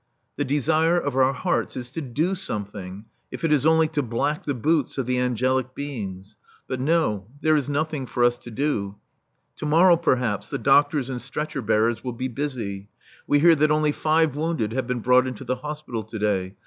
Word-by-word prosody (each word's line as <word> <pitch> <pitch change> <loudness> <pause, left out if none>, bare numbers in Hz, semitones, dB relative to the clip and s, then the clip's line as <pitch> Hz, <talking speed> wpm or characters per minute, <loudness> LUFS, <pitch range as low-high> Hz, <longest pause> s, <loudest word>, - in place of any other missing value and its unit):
The 145 - -1
desire 155 +5 +2
of 145 -5 -3
our 130 0 +4
hearts 175 +5 -1
is 125 -1 -6
to 160 - -4
do 150 +7 -1
something, 100 - -5 0.2
if - - -8
it 160 -2 +3
is 150 0 +3
only 160 0 +4
to 155 -2 -1
black 130 +5 -2
the 145 - -1
boots 150 +4 0
of 135 - -1
the 125 0 0
angelic 130 +1 0
beings. 105 -8 -6 0.3
But 130 - -3
no, 130 - +1
there 155 0 +3
is 145 -2 0
nothing 145 -2 -2
for 120 - 0
us 120 0 +3
to - - -10
do. 110 -6 -2 0.6
To 150 - -4
morrow, 170 +3 +6
perhaps, 125 - 0
the - - -2
doctors 140 +1 +3
and 125 -2 -4
stretcher 140 +2 -4
bearers 110 +1 +1
will 125 -2 -3
be 130 +2 -3
busy. 115 -7 -4 0.4
We 145 0 +3
hear 170 +1 +7
that 155 0 +3
only 150 0 +2
five 155 0 +1
wounded 155 -8 -1
have 130 -1 -2
been 125 -2 -2
brought 125 +2 +4
into 130 0 -6
the 130 0 -2
hospital 150 -4 -5
to 110 +1 -7
day. 100 -2 -1
130 Hz, 200 wpm, -24 LUFS, 115-150 Hz, 0.6 s, hear